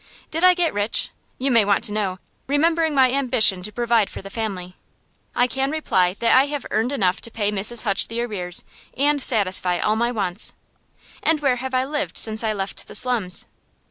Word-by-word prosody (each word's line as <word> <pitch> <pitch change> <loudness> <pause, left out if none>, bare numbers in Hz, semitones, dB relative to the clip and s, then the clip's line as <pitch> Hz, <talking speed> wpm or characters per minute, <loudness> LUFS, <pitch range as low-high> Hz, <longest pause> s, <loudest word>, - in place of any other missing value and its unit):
Did 325 +3 -2
I 365 0 +7
get 350 -2 +1
rich? 205 +2 0 0.3
you 270 +1 -1
may 230 -3 +5
want 200 +1 +1
to 225 - +5
know, 200 -3 -2 0.3
remembering 320 +2 +1
my 260 -2 +4
ambition 235 -8 +3
to 210 - -6
provide 235 -1 +1
for - - -9
the 195 - -9
family. 190 -5 -5 0.6
I 245 - +3
can 265 +2 -1
reply 190 - 0
that 235 - +3
I 265 +2 +5
have 290 -2 -4
earned 225 +4 0
enough 190 -10 0
to - - -2
pay 210 -2 -1
Mrs. 210 +3 0
Hutch 200 -4 +1
the 230 +1 -3
arrears, 180 -7 -3 0.3
and 290 +1 +2
satisfy 185 -7 +2
all 210 +5 0
my 235 +2 0
wants. 200 -3 -3 0.7
And 320 -1 +2
where 270 -4 +1
have 260 +1 -4
I 255 0 +1
lived 295 +2 -3
since 220 0 +1
I 220 - 0
left 195 -2 -5
the - - -8
slums? 225 -8 +1
230 Hz, 200 wpm, -22 LUFS, 200-270 Hz, 0.7 s, I